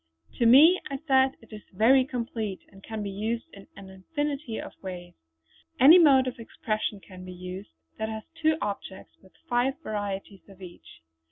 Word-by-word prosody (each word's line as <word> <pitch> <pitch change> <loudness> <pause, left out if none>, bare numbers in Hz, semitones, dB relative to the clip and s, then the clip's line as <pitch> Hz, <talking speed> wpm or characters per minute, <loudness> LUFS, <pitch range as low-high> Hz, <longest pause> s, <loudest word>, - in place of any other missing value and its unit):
"To 235 - +4
me," 310 +10 +7
I 275 - -3
said, 265 -2 +3
"it 225 - -16
is 210 - -9
very 245 +7 +4
complete, 230 -6 -4
and 195 -1 -16
can 220 -2 -6
be 200 - -4
used 220 +4 -3
in 200 -1 -14
an 190 -1 -11
infinity 280 - -4
of - - -8
ways. 180 -2 -8 0.7
Any 300 +8 +9
mode 275 -6 +5
of 255 -2 -5
expression 215 -2 -4
can 185 -1 -13
be 185 - -9
used 180 +1 -8 0.3
that 220 - -2
has 220 0 -6
two 315 -1 +1
objects 200 -1 -6
with 190 - -22
five 245 +2 +1
varieties 200 -3 -5
of 195 -1 -16
each." 175 - -14
220 Hz, 175 wpm, -26 LUFS, 195-265 Hz, 0.7 s, Any